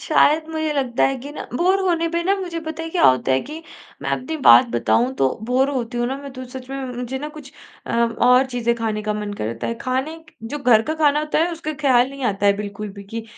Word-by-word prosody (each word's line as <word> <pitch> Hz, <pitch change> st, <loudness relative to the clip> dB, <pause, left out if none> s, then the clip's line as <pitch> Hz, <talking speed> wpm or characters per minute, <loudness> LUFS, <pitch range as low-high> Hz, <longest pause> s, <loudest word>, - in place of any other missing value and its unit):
शायद 310 Hz, +2 st, +3 dB
मुझे 315 Hz, -1 st, -1 dB
लगता 260 Hz, -4 st, +1 dB
है 270 Hz, -, -1 dB
कि 275 Hz, +4 st, -8 dB
ना -, -, -6 dB
बोर 375 Hz, +5 st, +2 dB
होने 335 Hz, -1 st, +1 dB
पे 340 Hz, 0 st, -1 dB
ना 390 Hz, +2 st, +3 dB
मुझे 350 Hz, -3 st, -4 dB
पता 315 Hz, 0 st, -6 dB
है 325 Hz, -, -5 dB
क्या 350 Hz, -, 0 dB
होता 130 Hz, +1 st, +2 dB
है 130 Hz, -, +2 dB
कि 310 Hz, +5 st, -8 dB, 0.4 s
मैं -, -, -2 dB
अपनी 315 Hz, +6 st, -2 dB
बात 255 Hz, -, +9 dB
बताऊँ 245 Hz, +3 st, +1 dB
तो 135 Hz, -, +3 dB, 0.2 s
बोर 265 Hz, +2 st, +3 dB
होती 245 Hz, -3 st, -3 dB
हूँ 240 Hz, -, +1 dB
ना 265 Hz, +2 st, -2 dB
मैं 280 Hz, -, -8 dB
तो 255 Hz, 0 st, -7 dB
सच 260 Hz, -1 st, -8 dB
में 270 Hz, -, -4 dB
म 250 Hz, -, -6 dB
मुझे 250 Hz, +2 st, -4 dB
ना 295 Hz, +2 st, -5 dB
कुछ 280 Hz, -2 st, -11 dB, 0.3 s
अ, -, -, -5 dB
और 245 Hz, +3 st, +3 dB
चीज़ें 240 Hz, -2 st, -1 dB
खाने 220 Hz, -2 st, -2 dB
का 210 Hz, 0 st, -1 dB
मन 210 Hz, -1 st, -4 dB
करता 115 Hz, +2 st, -3 dB
है, 230 Hz, -, -2 dB
खाने 260 Hz, +6 st, -2 dB
क -, -, -34 dB
जो 230 Hz, +6 st, -5 dB
घर 245 Hz, -6 st, +4 dB
का 310 Hz, +6 st, -3 dB
खाना 300 Hz, -2 st, +3 dB
होता 305 Hz, 0 st, -1 dB
है, 340 Hz, +2 st, +1 dB
उसका 320 Hz, -2 st, -4 dB
ख्याल 260 Hz, -2 st, +3 dB
नहीं 275 Hz, -2 st, -6 dB
आता 205 Hz, -2 st, 0 dB
है 200 Hz, -, +6 dB
बिल्कुल 210 Hz, 0 st, -5 dB
भी 200 Hz, 0 st, -11 dB
कि 225 Hz, +3 st, -6 dB
260 Hz, 260 wpm, -21 LUFS, 230-310 Hz, 0.4 s, बात